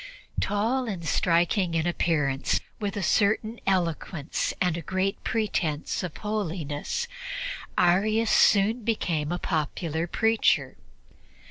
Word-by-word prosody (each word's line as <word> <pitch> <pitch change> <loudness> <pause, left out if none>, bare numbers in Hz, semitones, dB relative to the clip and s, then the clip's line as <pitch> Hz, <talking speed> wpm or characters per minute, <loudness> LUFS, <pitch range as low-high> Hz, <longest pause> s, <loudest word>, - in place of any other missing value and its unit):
Tall 230 +6 0
and 180 -6 -4
striking 175 +1 +2
in 160 0 +1
appearance, 150 -6 +1 0.2
with 205 -2 -3
a 200 - -2
certain 215 +5 +2
eloquence 170 -4 -1
and 180 -3 +1
a 170 - -4
great 190 +4 -2
pretense 180 -9 -1
of 180 -4 -5
holiness, 180 - -3 0.7
Arius 215 +5 +3
soon 220 +3 +4
became 170 -9 -1
a 175 - 0
popular 160 0 -2
preacher. 225 +5 +2
185 Hz, 110 wpm, -26 LUFS, 165-215 Hz, 0.7 s, soon